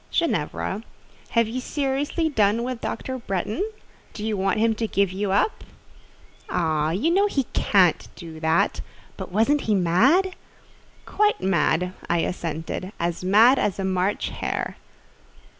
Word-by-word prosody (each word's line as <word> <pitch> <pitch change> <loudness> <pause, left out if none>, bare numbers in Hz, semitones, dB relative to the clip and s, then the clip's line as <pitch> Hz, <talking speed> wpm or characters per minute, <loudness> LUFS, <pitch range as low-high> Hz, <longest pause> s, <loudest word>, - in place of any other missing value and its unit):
"Ginevra, 195 - -1 0.5
have 230 -1 +2
you 250 +3 -4
seriously 285 +5 -1
done 220 -5 +2
with 250 -1 -4
Dr. 260 +2 -4
Bretton? 210 - -2 0.5
Do 210 - -5
you 220 -1 -1
want 195 +2 0
him 225 +1 +3
to 225 +1 -2
give 200 -3 +1
you 195 +1 -2
up?" 200 - +1 0.9
"Oh! 155 -3 0
you 210 - +1
know 395 +4 +3
he 280 -9 0
can't 185 -5 +3
do 160 -2 -9
that: 160 +1 +1 0.3
but - - -7
wasn't 230 +9 +2
he 215 - +1
mad?" 265 - +3 0.7
"Quite 420 0 +1
mad," 180 -1 +1 0.2
I 170 - +2
assented; 165 +2 -4
"as 170 +1 -2
mad 220 +8 +6
as 205 - 0
a 195 - -2
March 190 +2 0
hare." - - -3
205 Hz, 140 wpm, -24 LUFS, 180-255 Hz, 0.9 s, mad